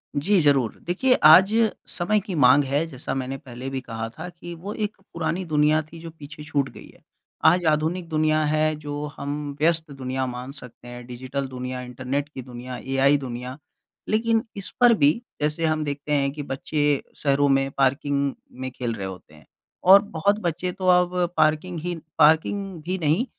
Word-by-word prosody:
जी, 190 +8 +2
ज़रूर। 135 -7 +2
देखिए, 225 +9 +2
आज 185 +7 +8 0.3
समय 210 +4 +1
की 195 -3 -6
माँग 140 0 +6
है, 140 +4 0
जैसा 135 -4 -5
मैंने 135 +1 -3
पहले 130 +1 -8
भी 135 -1 -4
कहा 115 -2 -5
था 150 - -8
कि 175 0 -10
वो 195 +5 -7
एक 210 -1 -3 0.2
पुरानी 170 +2 -2
दुनिया 155 0 +3
थी 165 - -10
जो 165 - -7
पीछे 150 -1 -11
छूट 140 -3 -1
गई - - -13
है। - - -23 0.4
आज 175 +1 +5
आधुनिक 165 +3 -1
दुनिया 155 0 +2
है 155 +1 +1
जो 145 0 -5
हम 145 +1 -3 0.2
व्यस्त 160 -1 +2
दुनिया 130 -1 -3
मान 125 +1 -6
सकते 125 -3 -12
हैं, 120 0 -9
डिजिटल 130 +2 -4
दुनिया, 125 0 -5
इंटरनेट 130 +3 -4
की 135 - -8
दुनिया, 125 0 -8
एआइ 135 +2 +2
दुनिया। 125 0 -6 0.5
लेकिन 225 +1 +2
इस 195 - -6
पर 240 -1 +7
भी, 145 -8 +4 0.3
जैसे 150 +2 0
हम 155 -1 +1
देखते 145 0 -5
हैं 140 -1 +2
कि 145 0 -6
बच्चे 145 +1 -1
शहरों 145 0 +2
में 135 0 +2
पार्किंग 140 +1 +1 0.3
में 130 - -3
खेल 120 -2 -3
रहे 95 - -5
होते 90 -4 -10
हैं, 75 - -18 0.4
और 195 +2 +8
बहुत 200 +1 0
बच्चे 180 -1 -2
तो 185 0 -4
अब 180 0 +4 0.2
पार्किंग 155 +3 +1
ही 175 +2 -3 0.2
पार्किंग 160 +4 +3
भी 185 +3 -2
नहीं, 165 - +1
150 Hz, 180 wpm, -24 LUFS, 135-170 Hz, 0.5 s, आज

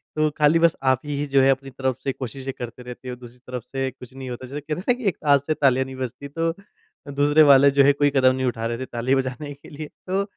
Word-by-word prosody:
तो 155 0 +2
खाली 150 +2 +4
बस 165 -1 +4 0.2
आप 130 - +1
ही 145 0 -2
जो 135 -1 +3
है 135 - +4
अपनी 135 0 -2
तरफ 130 -1 -2
से 135 - 0
कोशिशें 135 +1 -6
करते 120 +1 -7
रहते 125 +1 -9
हो 125 - -5
दूसरी 125 0 -14
तरफ 125 -2 -5
से 135 +1 -3
कुछ 125 0 -14
नहीं 135 -1 -7
होता। 125 +1 -7
जैसे 145 +3 -6
कहते 150 +2 -4
है - - -7
ना - - +6
कि - - -6
एक - - -7
हाथ 140 -1 +5
से 155 - +2
तालियाँ 130 -3 +2
नहीं 130 - -9
बजती 130 +2 -6
तो 165 +3 -1 0.6
दूसरे 145 +2 +4
वाले 140 -1 +7
जो 140 0 +5
है 140 +1 +5
कोई 145 0 +2
कदम 130 -1 +4
नहीं 130 - -1
उठा 115 -2 -2
रहे 115 0 -2
थे 130 - -5
ताली 120 +3 0
बजाने 135 +2 -3
के 140 - -16
लिए। 150 0 -7 0.2
तो 195 +2 0
135 Hz, 270 wpm, -23 LUFS, 130-145 Hz, 0.6 s, वाले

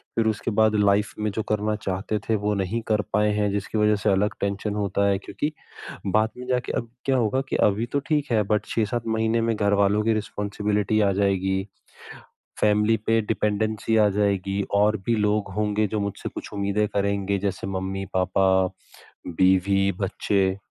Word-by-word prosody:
फ़िर 115 -1 +2
उसके 110 +1 -1
बाद 110 0 +3
लाइफ़ 100 0 +2
में 105 - 0
जो 110 +2 -3
करना 105 0 0
चाहते 95 +3 -2
थे 110 - +3
वो 105 - +2
नहीं 105 +5 -2
कर 105 -1 +2
पाए 105 +1 +3
हैं 105 0 +1
जिसकी 100 +2 -3
वज़ह 105 0 +3
से - - +3
अलग 100 +2 +1
टेंशन 100 +1 -2
होता 100 -1 0
है 100 - +2
क्योंकि 150 +8 -3 0.6
बाद 110 +3 +3
में 125 - -8
जाके 125 -1 -1
अब 115 - -4 0.2
क्या 135 - +2
होगा 120 +2 +1
कि - - -1
अभी 105 +4 -2
तो 140 - +2
ठीक 150 -4 0
है 110 -2 +3
बट 105 - +1
6-7 115 +1 -1
महीने 110 +1 +1
में 115 0 0
घरवालों 100 0 +2
की 115 - +2
रिस्पॉन्सिबिलिटी 105 0 -1
आ 100 -1 +3
जाएगी, 95 0 0 0.9
फैमिली 105 +1 +3
पे 115 0 +4
डिपेंडेंसी 110 +1 -1
आ 105 -1 +5
जाएगी 100 -1 0 0.2
और 105 +1 +3
भी 115 - +2
लोग 105 -1 0
होंगे 105 0 +1
जो 105 +2 -2
मुझसे 100 -1 -4
कुछ - - -8
उम्मीदें 100 +1 0
करेंगे 100 0 0
जैसे 95 -1 -3
मम्मी-पापा, 95 0 -1 0.8
बीवी-बच्चे। 95 +1 +1
105 Hz, 170 wpm, -24 LUFS, 100-110 Hz, 0.9 s, आ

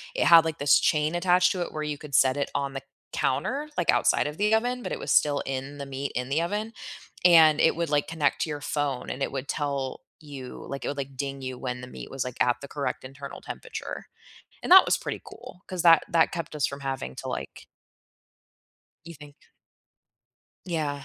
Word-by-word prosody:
it - - +1
had, 165 -1 +8
like, 160 -2 -3
this 145 0 +5
chain 155 +1 +1
attached 180 +1 +3
to 185 - -2
it 175 - -3
where 155 - -3
you 150 -1 -3
could 145 -2 -6
set 130 +1 +4
it 140 - -1
on 140 -1 -1
the 135 - -5 0.3
counter, 275 - -1
like, - - +3
outside - - +2
of 150 +1 -6
the 210 +2 +2
oven, 245 +2 -1
but - - -5
it - - -2
was - - -3
still 145 -1 +3
in 135 +2 -4
the 140 - -6
meat 135 +1 -4
in 125 +1 -2
the 150 +4 +1
oven, 210 +6 -3 0.5
and 160 -3 +7
it 160 - +4
would, 170 -1 -2
like, 145 -1 +1
connect 155 -4 0
to 160 - -1
your 145 -1 -4
phone, 145 -3 -2
and 135 - -6
it - - -2
would 135 0 -5
tell 140 -3 -2 0.3
you 135 -3 -9
like, 140 - -5
it - - -2
would, 145 - -2
like, 135 -1 -6
ding 135 0 -4
you 130 -1 -5
when 125 -1 -4
the 125 - -8
meat - - -9
was, 135 -1 -3
like, 125 -1 -7
at 125 -1 +4
the 140 - -8
correct 140 -1 -3
internal 135 +1 -9
temperature, - - -7 0.6
and - - -4
that 380 +1 +10
was - - +3
pretty - - -5
cool 180 - -12
'cause 185 -2 -3
that 165 -2 +7
that 165 -4 +3
kept 165 -2 -5
us 150 - +1
from 140 0 -8
having 135 - -4
to - - -7
like - - -6 1.4
You 170 - -9
think? 145 -1 -14 1.3
Yeah. 150 -5 -2
145 Hz, 220 wpm, -26 LUFS, 135-165 Hz, 1.4 s, that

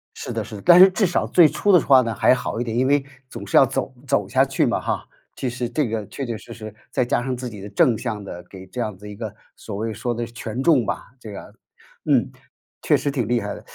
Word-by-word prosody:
是 - - -6
的 - - -2
是 110 - -9
的， 100 - -10
但 175 0 +7
是 190 +1 +10
至 195 +2 +1
少 180 - 0
最 175 -3 +6
初 205 +6 +1
的 180 - +7
话 135 -2 +6
呢 115 -2 -2
还 110 - +4
好 120 - -4
一 - - 0
点， 115 -1 -3
因 130 - +2
为 145 0 +3 0.3
总 - - -8
是 - - -3
要 - - +8
走 130 - -3
走 105 -6 +1
下 130 +6 +3
去 135 0 +1
嘛 - - 0
哈， - - -3 0.3
其 130 - -3
实 125 -1 -4
这 125 +2 0
个 110 -2 -3
确 140 - -6
确 115 -3 -4
实 115 - -11
实 110 -2 -9 0.2
再 125 - +1
加 120 - 0
上 130 0 -2
自 125 0 -6
己 105 -3 -10
的 100 - -8
正 125 - +3
向 110 -4 -4
的 90 -3 -8
给 95 -1 -11
这 125 +5 -5
样 105 -3 -3
子 105 - -14
的 - - -7
一 105 - -8
个， 110 -1 -6 0.2
所 105 - -8
谓 110 +1 -3
说 120 +4 -3
的 120 0 -3
权 115 +1 -6
重 140 -7 +4
吧， 115 - -5
这 110 -3 -9
个 100 - -10 0.5
嗯， - - +2 0.5
确 - - +3
实 145 - -2
挺 130 -6 -2
厉 120 +1 +1
害 105 -2 -4
的。 - - -13
120 Hz, 295 characters per minute, -22 LUFS, 110-130 Hz, 0.5 s, 是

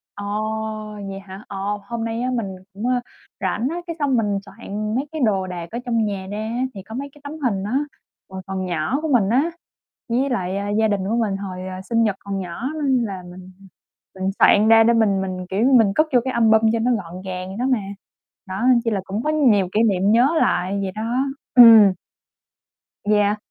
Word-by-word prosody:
ờ, 205 - -6 0.8
vậy 195 0 -6
hả? 195 +1 -11
Ờ, 200 - -7 0.3
hôm 235 -1 -4
nay 230 +1 -3
á 255 - -1
mình 230 -5 -1 0.3
cũng 210 +4 -6 0.6
rảnh 240 - -1
á, 330 - -4
cái 335 - -4
xong 280 -4 +1
mình 205 -3 0
soạn 210 +1 -5
mấy 270 +4 -1
cái 315 -3 -4
đồ 195 -3 0
đạc 175 -2 -6
ở 235 - -4
trong 230 -3 +1
nhà 195 -2 -4
ra 205 - -4
á, 230 +4 -2
thì 195 -3 -9
có 220 - -9
mấy 280 +3 -5
cái 295 - -19
tấm 285 +1 -7
hình 195 -5 0
á, 210 +5 -2 0.5
hồi 190 0 -7
còn 190 -1 -3
nhỏ 175 - -1
của 320 - -2
mình 205 -6 +3
á, 275 +9 +2 0.6
với 255 +4 +1
lại 190 -7 -2 0.2
gia 220 - +3
đình 205 -2 0
của 225 - +1
mình 210 -4 0
hồi, 185 -2 -6
à, 185 0 -6
sinh 230 -1 +3
nhật 210 -4 +1
còn 200 -1 -4
nhỏ 185 +8 -4
nên 260 -3 +2
là 190 -3 -6
mình 185 +1 -12 0.6
mình 190 0 -2
soạn 215 +1 +5
ra 225 0 +7
để 235 - +4
mình 215 -4 +2
mình, 185 -1 -4
kiểu, 200 +4 +1
mình 210 -4 +3
cất 310 - +3
vô 245 - +6
cái 260 - -2
album 220 -2 +4
cho 230 - +1
nó 240 +3 +1
gọn 185 -4 -4
gàng 185 +1 -6
đó 245 - -1
mà. 255 - +3 0.7
Đó, 190 +4 -4 0.2
chỉ 230 - +1
là 205 -3 -1
cũng 205 +5 -4
có 305 - 0
nhiều 235 -12 +3
kỷ 215 - +3
niệm 200 -3 +2
nhớ 240 +4 +5
lại 180 +3 +1
vậy 190 -1 -3
đó. 215 +3 -5 0.5
Ừm. 225 -5 +9 1.1
Yeah. 210 0 +2
210 Hz, 215 wpm, -21 LUFS, 190-235 Hz, 1.1 s, Ừm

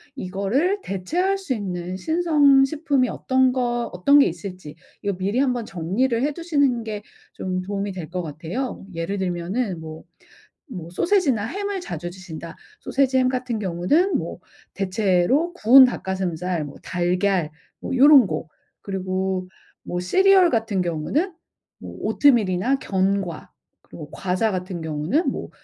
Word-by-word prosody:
이거를 255 - -1
대체할 345 - -1
수 380 -9 -3
있는 185 -4 -4
신선 300 - +4
식품이 280 -2 +1
어떤 260 0 +2
거 240 -2 -1
어떤 280 +12 +4
게 280 - +6
있을지 185 -7 -7 0.3
이거 200 -3 -2
미리 205 +6 0
한번 250 -4 0
정리를 220 +8 -1
해두시는 285 -5 0
게 215 -2 -5 0.3
좀 185 -1 -3
도움이 200 +1 -3
될 180 -4 -7
것 180 - -1
같아요. 170 - -5
예를 165 +4 -3
들면은 185 +2 -2
뭐, 160 0 -9 0.6
뭐 180 - -8
소시지나 295 - +1
햄을 400 - -3
자주 175 - -5
드신다 175 -3 -9 0.3
소시지 265 -1 +1
햄 255 0 +3
같은 250 -2 -2
경우는 205 - +1
뭐 - - -6 0.4
대체로 195 - +1
구운 260 -4 +8
닭 250 - -3
가슴살 180 -3 -2
뭐 145 - -10
달걀 180 -1 0 0.3
뭐 - - -4
요런 275 -3 +7
거. 155 -1 -4 0.3
그리고 190 -1 -2 0.4
뭐 175 - -3
시리얼 380 - +5
같은 220 -5 0
경우는 180 - -1 0.5
뭐 - - -9
오트밀이나 240 -2 +3
견과 190 -5 -1 0.3
그리고 150 -3 -11
과자 190 +4 -1
같은 185 -2 -4
경우는 160 - 0
뭐 - - -6
200 Hz, 285 characters per minute, -23 LUFS, 180-270 Hz, 0.6 s, 구운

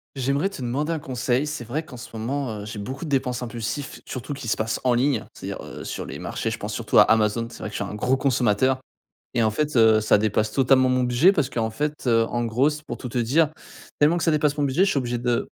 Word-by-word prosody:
J'aimerais 140 +8 0
te 195 - -9
demander 135 +6 -1
un 160 - -1
conseil, 130 0 -1
c'est 150 -4 -4
vrai 135 +8 -3
qu'en 125 - -10
ce 120 -1 -11
moment, 120 0 -3
heu, - - -7
j'ai 105 0 -6
beaucoup 130 +9 -5
de - - -6
dépenses 130 -3 0
impulsifs 120 +4 -5
surtout 130 +3 -5
qui 135 -3 -8
se 115 - 0
passent 110 0 -1
en 125 - +4
ligne, 125 0 +1
c'est-à-dire, - - -7
heu, - - -9
sur - - -5
les - - -7
marchés - - -3
je - - -4
pense - - -5
surtout - - +1
à - - +10
Amazon, 110 +1 +2
c'est - - -12
vrai 105 - -4
que - - -11
je - - -2
suis 100 - -4
un - - -6
gros 125 +5 +1
consommateur 130 -1 +2 0.6
et 120 - +2
en 110 - +3
fait 150 +4 -1
heu, 110 -1 +6
ça 110 - +4
dépasse 110 +1 +1
totalement 130 +1 +4
mon 130 0 +2
budget 125 +9 +5
parce 150 -8 0
qu'en 110 -2 -1
fait, 150 +6 -3
heu, 115 -2 +4
en 120 0 -1
gros 125 +6 +2
c 150 0 -6
pour - - -5
tout 125 - -7
te 125 - -2
dire 145 +7 +3 0.5
tellement 150 +4 +4
que 170 - -1
ça 165 - +3
dépasse 150 -1 +2
mon 145 - +1
budget 145 +8 +2
je - - +2
suis 145 - +1
obligé 120 -2 -2
de 120 -1 0
125 Hz, 270 wpm, -24 LUFS, 115-145 Hz, 0.6 s, à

